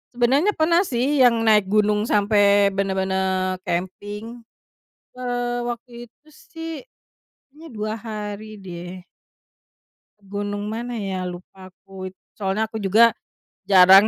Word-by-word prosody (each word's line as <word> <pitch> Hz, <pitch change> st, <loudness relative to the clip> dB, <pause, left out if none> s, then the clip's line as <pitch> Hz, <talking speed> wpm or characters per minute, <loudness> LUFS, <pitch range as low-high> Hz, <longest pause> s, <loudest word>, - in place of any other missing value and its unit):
sebenernya 275 Hz, -, +3 dB
pernah 335 Hz, +2 st, +3 dB
sih 265 Hz, +4 st, 0 dB
yang 245 Hz, -2 st, +6 dB
naik 210 Hz, -3 st, +4 dB
gunung 210 Hz, +1 st, +2 dB
sampai 205 Hz, -1 st, +4 dB
benar-benar 190 Hz, -1 st, 0 dB
camping, 205 Hz, +6 st, -4 dB, 0.7 s
eee, 245 Hz, -1 st, -2 dB
waktu 240 Hz, +1 st, -6 dB, 0.2 s
itu 295 Hz, +6 st, -35 dB
sih 325 Hz, +1 st, -9 dB, 0.8 s
kayaknya 305 Hz, +4 st, -14 dB
2 215 Hz, -1 st, -3 dB
hari 215 Hz, -1 st, -7 dB
deh. 180 Hz, -1 st, -8 dB, 1.2 s
Gunung 205 Hz, +1 st, -4 dB
mana 235 Hz, +3 st, -4 dB
ya 190 Hz, -3 st, -3 dB
lupa 180 Hz, +1 st, -10 dB
aku, 190 Hz, 0 st, -9 dB, 0.3 s
soalnya 210 Hz, +2 st, -1 dB
aku 220 Hz, -, -5 dB
juga 220 Hz, +3 st, +5 dB, 0.6 s
jarang 190 Hz, +1 st, +8 dB
210 Hz, 110 wpm, -22 LUFS, 190-235 Hz, 1.2 s, jarang